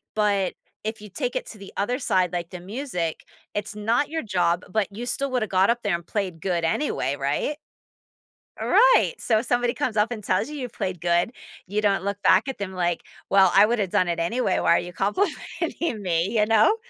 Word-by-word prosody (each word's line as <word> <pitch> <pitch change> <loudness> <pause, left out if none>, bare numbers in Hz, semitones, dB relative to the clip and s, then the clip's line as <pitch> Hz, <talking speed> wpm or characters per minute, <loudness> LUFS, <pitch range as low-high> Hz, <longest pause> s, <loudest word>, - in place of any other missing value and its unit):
but 200 -3 +1 0.3
if 220 0 -4
you 210 - -10
take 245 +5 -3
it - - -2
to 215 - -10
the 195 - -10
other 245 +6 0
side, 185 - +1
like 175 -1 -3
the 180 - -8
music, 180 - -4 0.3
it's 205 0 -4
not 230 +7 +1
your 320 +1 -3
job, 180 -4 +1
but 215 -2 +1
you 225 +5 -6
still 275 +3 -1
woulda 250 -4 0
got 190 0 +3
up 235 0 +1
there 205 -4 +1
and 170 -1 -3
played 185 -6 -3
good 175 -3 -1
anyway, 165 - 0
right? 145 - -1 1.0
Right! - - +5
So 220 -3 +2
if 230 - -5
somebody 245 0 +1
comes 270 -7 -2
up 210 +3 +2
and 220 -3 -5
tells 195 +6 0
you 300 - -6
you 250 -3 -4
played 190 -5 -4
good, 175 +5 +1 0.4
you 210 +2 -1
don't 200 -2 +2
look 200 0 -2
back 190 +7 +5
at 265 - -5
them 195 -2 -5
like, 175 -2 -1 0.3
"Well, 190 -2 +5
I 200 +2 +8
woulda 215 -3 0
done 180 0 +1
it 170 -1 -1
anyway, 190 +3 +1
why - - +4
are - - +3
you 175 0 -6
complimenting 315 - -2
me," 170 -2 +1
you 210 - +4
know? 220 - +4
205 Hz, 215 wpm, -24 LUFS, 180-240 Hz, 1.0 s, I